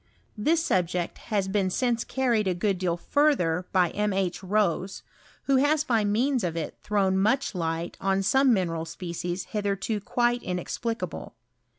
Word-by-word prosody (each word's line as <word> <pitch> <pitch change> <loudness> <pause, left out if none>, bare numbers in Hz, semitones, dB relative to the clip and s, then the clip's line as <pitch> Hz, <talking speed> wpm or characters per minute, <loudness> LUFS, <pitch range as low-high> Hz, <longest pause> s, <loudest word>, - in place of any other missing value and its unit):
This 315 +10 +1
subject 180 -1 0
has 200 -4 +1
been 190 -1 +1
since 235 +3 0
carried 240 -5 0
a^good 185 +1 0
deal 175 -2 0
further 180 - +1
by 180 -3 +3
M. 210 -1 0
H. 190 -2 -1
Rose, 190 -1 0 0.4
who 275 -1 +3
has 290 +3 +3
by 235 -7 +1
means 240 +4 +1
of 170 -2 -2
it 160 - -4
thrown 195 -2 +1
much 220 +5 +1
light 165 -1 -3
on 195 0 +1
some 265 +6 +4
mineral 170 -6 0
species 175 +2 -4
hitherto 205 +1 -1
quite 240 +3 0
inexplicable. 225 +6 -4
195 Hz, 150 wpm, -26 LUFS, 180-235 Hz, 0.4 s, some